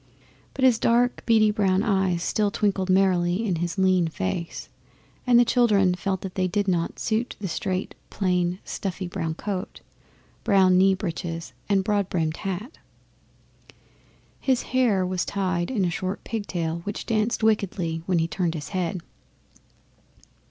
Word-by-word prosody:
But 260 Hz, -, +2 dB
his 240 Hz, -3 st, +5 dB
dark 245 Hz, +1 st, +2 dB
beady 220 Hz, -2 st, +5 dB
brown 195 Hz, -2 st, +1 dB
eyes 190 Hz, -5 st, +1 dB
still 210 Hz, +1 st, +1 dB
twinkled 200 Hz, -2 st, 0 dB
merrily 185 Hz, +1 st, +2 dB
in 185 Hz, -5 st, 0 dB
his 175 Hz, +2 st, -3 dB
lean 185 Hz, -2 st, +3 dB
face, 160 Hz, -, -4 dB, 0.6 s
and 245 Hz, -1 st, +6 dB
the 240 Hz, -, +5 dB
children 210 Hz, -7 st, +3 dB
felt 190 Hz, +1 st, -2 dB
that 190 Hz, -2 st, -6 dB
they 185 Hz, -1 st, 0 dB
did 200 Hz, +3 st, -1 dB
not 170 Hz, -3 st, 0 dB
suit 230 Hz, +2 st, -1 dB
the 200 Hz, -, -3 dB
straight, 185 Hz, +2 st, -3 dB, 0.2 s
plain, 180 Hz, -2 st, 0 dB
snuffy 190 Hz, -1 st, -4 dB
brown 165 Hz, -3 st, -3 dB
coat, 195 Hz, +1 st, -5 dB, 0.6 s
brown 190 Hz, -4 st, +4 dB
knee 190 Hz, +1 st, +5 dB
breeches, 170 Hz, -3 st, -5 dB, 0.2 s
and 195 Hz, -1 st, +3 dB
broad 200 Hz, -1 st, 0 dB
brimmed 160 Hz, -2 st, -1 dB
hat. 195 Hz, -, -5 dB, 1.6 s
His 260 Hz, -2 st, +1 dB
hair 225 Hz, -8 st, +3 dB
was 180 Hz, -2 st, -1 dB
tied 185 Hz, -3 st, -1 dB
'in 210 Hz, -8 st, 0 dB
a 175 Hz, -, 0 dB
short 185 Hz, +3 st, -4 dB
pigtail 175 Hz, -7 st, -3 dB
which 205 Hz, +4 st, -5 dB
danced 220 Hz, 0 st, 0 dB
wickedly 185 Hz, -6 st, 0 dB
when 185 Hz, -2 st, +2 dB
he 165 Hz, 0 st, +1 dB
turned 170 Hz, -1 st, -1 dB
his 150 Hz, -, -6 dB
head. 180 Hz, -2 st, -2 dB
190 Hz, 150 wpm, -25 LUFS, 175-210 Hz, 1.6 s, and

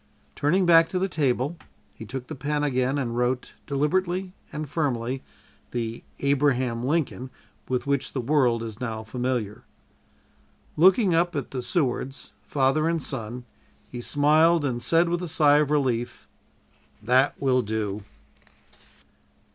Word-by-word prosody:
'" -, -, -37 dB
Turning 180 Hz, +6 st, +2 dB
back 165 Hz, -1 st, +6 dB
to 185 Hz, -, -2 dB
the 190 Hz, +1 st, +1 dB
table, 145 Hz, -2 st, 0 dB, 0.4 s
he 110 Hz, -, -10 dB
took 130 Hz, +1 st, -5 dB
the 155 Hz, -, -7 dB
pen 145 Hz, +2 st, -2 dB
again 130 Hz, -1 st, +1 dB
and 120 Hz, -4 st, -2 dB
wrote, 125 Hz, +1 st, -1 dB
deliberately 180 Hz, +6 st, 0 dB, 0.2 s
and 150 Hz, 0 st, -5 dB
firmly, 130 Hz, -4 st, -2 dB, 0.5 s
the 115 Hz, -1 st, -4 dB, 0.2 s
"Abraham 130 Hz, -4 st, +1 dB
Lincoln" 135 Hz, -3 st, -1 dB, 0.4 s
with 125 Hz, -1 st, -1 dB
which 140 Hz, -1 st, -1 dB
the 135 Hz, -, -2 dB
world 125 Hz, -3 st, +2 dB
is 110 Hz, -1 st, -7 dB
now 110 Hz, -3 st, -3 dB
familiar. 120 Hz, -2 st, -3 dB, 1.1 s
Looking 190 Hz, +3 st, +5 dB
up 170 Hz, +1 st, +2 dB
at 140 Hz, -4 st, -3 dB
the 130 Hz, -, -3 dB
Sewards, 135 Hz, -2 st, -2 dB
father 145 Hz, +3 st, +1 dB
and 165 Hz, -3 st, -1 dB
son, 120 Hz, -1 st, -5 dB, 0.5 s
he 120 Hz, -, -6 dB
smiled 155 Hz, +4 st, +3 dB
and 120 Hz, -3 st, -2 dB
said, 165 Hz, +6 st, +3 dB
with 175 Hz, +1 st, -1 dB
a 180 Hz, -, -3 dB
sigh 150 Hz, -2 st, +4 dB
of 150 Hz, -2 st, +1 dB
relief: 125 Hz, -5 st, -1 dB, 0.8 s
"_That 130 Hz, +4 st, +4 dB
will 130 Hz, -2 st, +2 dB
do! 105 Hz, -2 st, -3 dB
135 Hz, 140 wpm, -25 LUFS, 125-155 Hz, 1.1 s, back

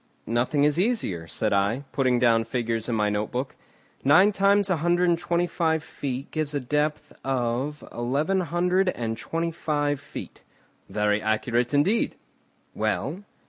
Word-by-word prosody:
"Nothing 125 Hz, +5 st, +1 dB
is 150 Hz, +2 st, +3 dB
easier," 180 Hz, -, 0 dB
said 105 Hz, +6 st, -1 dB
I, 100 Hz, +7 st, +1 dB
putting 130 Hz, -2 st, +2 dB
down 115 Hz, -2 st, +4 dB
figures 115 Hz, 0 st, -2 dB
in 115 Hz, -, 0 dB
my 105 Hz, -1 st, +1 dB
note 105 Hz, +1 st, -1 dB
book. 130 Hz, +2 st, -3 dB, 0.5 s
"Nine 180 Hz, +10 st, +6 dB
times 200 Hz, 0 st, +3 dB
a 180 Hz, -, +2 dB
hundred 175 Hz, +3 st, +2 dB
and 170 Hz, -1 st, +2 dB
twenty 175 Hz, 0 st, +1 dB
five 160 Hz, -3 st, 0 dB
feet 135 Hz, -2 st, -5 dB
gives 155 Hz, -2 st, -2 dB
a -, -, +1 dB
depth 150 Hz, +3 st, -1 dB
of 130 Hz, +3 st, -1 dB
eleven 140 Hz, +11 st, 0 dB
hundred 180 Hz, +2 st, +1 dB
and 115 Hz, -9 st, -3 dB
twenty 165 Hz, +7 st, -3 dB
five 145 Hz, -3 st, -1 dB
feet." 140 Hz, -, -9 dB, 0.5 s
"Very 105 Hz, 0 st, +1 dB
accurate 115 Hz, +3 st, 0 dB
indeed." 190 Hz, +11 st, +2 dB, 0.6 s
"Well?" 200 Hz, +4 st, -2 dB
145 Hz, 150 wpm, -25 LUFS, 120-170 Hz, 0.6 s, Nine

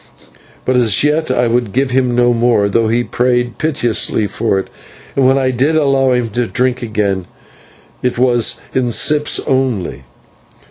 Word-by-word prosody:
But 130 Hz, 0 st, +1 dB
as 115 Hz, -3 st, +3 dB
yet 150 Hz, +1 st, +1 dB
I 125 Hz, -1 st, +1 dB
would 120 Hz, -3 st, -1 dB
give 135 Hz, 0 st, 0 dB
him 125 Hz, -1 st, +1 dB
no 120 Hz, 0 st, +3 dB
more, 115 Hz, -3 st, +2 dB
though 115 Hz, +3 st, +1 dB
he 120 Hz, +2 st, +1 dB
prayed 120 Hz, 0 st, 0 dB
for -, -, -14 dB
it -, -, -24 dB, 0.2 s
piteously, 115 Hz, -2 st, 0 dB, 0.9 s
and 135 Hz, -2 st, +3 dB
when 135 Hz, +1 st, +3 dB
I 130 Hz, -1 st, +1 dB
did 140 Hz, +6 st, +1 dB
allow 135 Hz, -3 st, +2 dB
him 125 Hz, -2 st, -1 dB
to 120 Hz, +2 st, -1 dB
drink 125 Hz, +1 st, -1 dB
again 100 Hz, -5 st, -2 dB, 0.7 s
it 125 Hz, -1 st, -1 dB
was 120 Hz, -3 st, +1 dB
in 125 Hz, -2 st, 0 dB
sips 150 Hz, +5 st, +2 dB
only. 125 Hz, -, -2 dB
125 Hz, 165 wpm, -15 LUFS, 115-130 Hz, 0.9 s, as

